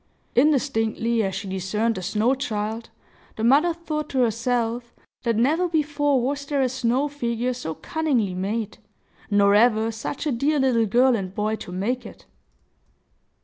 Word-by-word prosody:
Indistinctly 235 -4 +2
as 190 -3 -2
she 200 +1 -5
discerned 190 +5 -1
the 185 - -6
snow 210 +7 +1
child, 220 -3 -3 0.5
the 220 - -4
mother 285 +9 +4
thought 310 -3 -4
to 260 - +1
herself 235 0 -1 0.3
that 230 -2 0
never 310 +10 +2
before 290 -3 +1
was 275 +3 -2
there 280 -2 +1
a 255 - +1
snow 260 +2 0
figure 245 -3 -2
so 200 -11 -5
cunningly 265 -12 -1
made, 205 +4 -3 0.5
nor 200 -1 +4
ever 220 +1 +4
such 225 +7 -5
a 300 - +1
dear 280 +5 +1
little 240 -4 +2
girl 245 +4 +4
and 190 -3 -4
boy 215 +1 0
to 180 - -9
make 230 +8 -2
it. - - -12
235 Hz, 155 wpm, -24 LUFS, 215-275 Hz, 0.5 s, mother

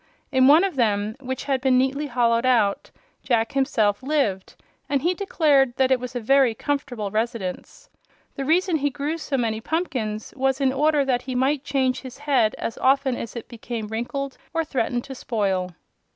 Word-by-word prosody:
In 260 -1 +4
one 305 +6 +7
of 385 -7 -2
them, 210 -2 +1
which 260 -1 -5
had 270 -2 -1
been 260 -1 +3
neatly 270 +3 0
hollowed 235 -2 +2
out, 230 -6 +2 0.3
Jack 230 -3 +1
himself 225 -7 +1
lived, 260 -10 -1 0.3
and 280 -1 0
he 350 +2 +2
declared 295 -9 +2
that 265 0 +2
it 260 - +4
was 250 0 -7
a - - 0
very 260 0 +3
comfortable 245 -7 -3
residence. 225 - -4 0.5
The 275 - -4
reason 335 +4 +2
he 285 -1 0
grew 290 +4 -3
so 280 -3 -2
many 225 -3 -1
pumpkins 235 -9 -3
was 265 0 0
in 265 -2 +2
order 295 +1 +2
that 250 -2 +1
he 255 0 -5
might 270 +2 +1
change 265 -3 0
his 260 -1 -10
head 270 -7 +1
as 230 - -5
often 270 -1 +2
as 230 - -7
it 235 - -7
became 230 -2 -6
wrinkled 260 +5 -4 0.2
or 330 - +2
threatened 245 -4 -1
to 270 - -8
spoil. 195 -7 -1
260 Hz, 180 wpm, -23 LUFS, 230-280 Hz, 0.5 s, one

